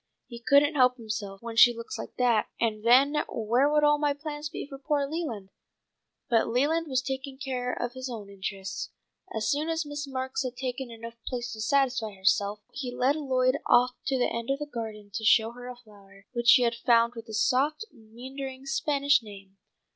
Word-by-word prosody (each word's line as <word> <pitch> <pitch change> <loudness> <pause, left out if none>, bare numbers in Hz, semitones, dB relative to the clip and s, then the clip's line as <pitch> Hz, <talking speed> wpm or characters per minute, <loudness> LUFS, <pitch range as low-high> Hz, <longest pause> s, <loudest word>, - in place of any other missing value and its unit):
He 235 -2 -10
couldn't 285 +5 +4
help 255 -3 +4
himself 215 -3 -6
when 230 -1 -6
she 240 +1 +7
looks 230 - -6
like - - -8
that, 240 -4 +2
and 215 -2 -1
then 270 +5 +5
where 240 +6 +1
would 300 0 +3
all 295 0 +4
my 290 -1 +2
plans 295 0 -6
be - - -6
for 275 -2 -10
poor 285 0 0
Leland?" 275 - -4 0.8
But 230 -2 +2
Leland 295 +8 +1
was 260 -2 0
taking 265 +1 -5
care 255 -3 -3
of 245 0 -3
his 260 0 -6
own 220 -4 -7
interests. 195 -1 -5 0.4
As 220 -1 -2
soon 305 +2 0
as 325 -1 -1
Miss 290 0 -5
Marks 260 0 -3
had 255 -2 -4
taken 255 -1 -4
enough 230 0 -9
plates 245 -2 -3
to 220 - -7
satisfy 250 -3 +1
herself 200 +2 +1
he 260 -2 -4
led 260 +3 +1
Lloyd 260 -2 +1
off 245 +1 +5 0.2
to 270 - +1
the 245 - +2
end 235 +1 -4
of 275 - +1
the 295 - -4
garden 220 -6 -7
to 220 - -4
show 225 +1 +4
her 245 +1 -10
a 250 - -7
flower 200 -4 -19
which 240 -1 +5
he 250 - +5
had 235 -1 +2
found 235 0 +3
with 230 -1 -9
a - - -7
soft 280 - +1
meandering 260 +3 -9
Spanish 280 0 +2
name. 195 -3 -13
250 Hz, 200 wpm, -28 LUFS, 225-275 Hz, 0.8 s, she